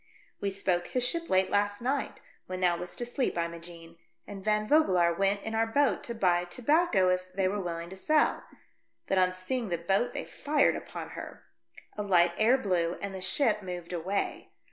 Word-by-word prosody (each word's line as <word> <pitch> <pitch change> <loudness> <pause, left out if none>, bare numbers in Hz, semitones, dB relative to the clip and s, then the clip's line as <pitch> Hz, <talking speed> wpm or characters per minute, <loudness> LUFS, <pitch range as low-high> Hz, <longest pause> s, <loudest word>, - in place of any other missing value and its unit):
" - - -34
We 200 - 0
spoke 185 -2 -1
his 250 -1 0
ship 335 +4 -2
late 185 0 +3
last 205 0 +1
night, 265 +4 -2 0.3
when 185 0 -4
thou 180 -1 +3
wast 175 +1 -7
asleep, 240 +2 -1
Imogenc, 170 0 -5 0.3
and 195 -2 -9
Van 215 0 +1
Vogelaar 185 - +4
went 195 +2 +1
in 220 - -4
our 225 0 +1
boat 280 +5 +2
to 235 - -5
buy 180 -5 +2
tobacco, 245 - +2
if 185 0 -1
they 195 -1 +1
were 200 +2 -1
willing 170 -1 -5
to - - -7
sell, 305 +10 +2 0.6
but 190 - +1
on 185 0 +2
seeing 225 +5 -3
the 170 - 0
boat 195 +8 0
they - - -3
fired 290 -1 +1
upon - - -7
her. - - -9 0.5
A - - -1
light 175 -4 +4
air 235 +5 +5
blew, 180 -7 0
and 200 -1 -5
the 190 - -6
ship 210 +2 +1
moved 180 -2 -6
away. 185 +4 -2
195 Hz, 190 wpm, -29 LUFS, 175-225 Hz, 0.6 s, air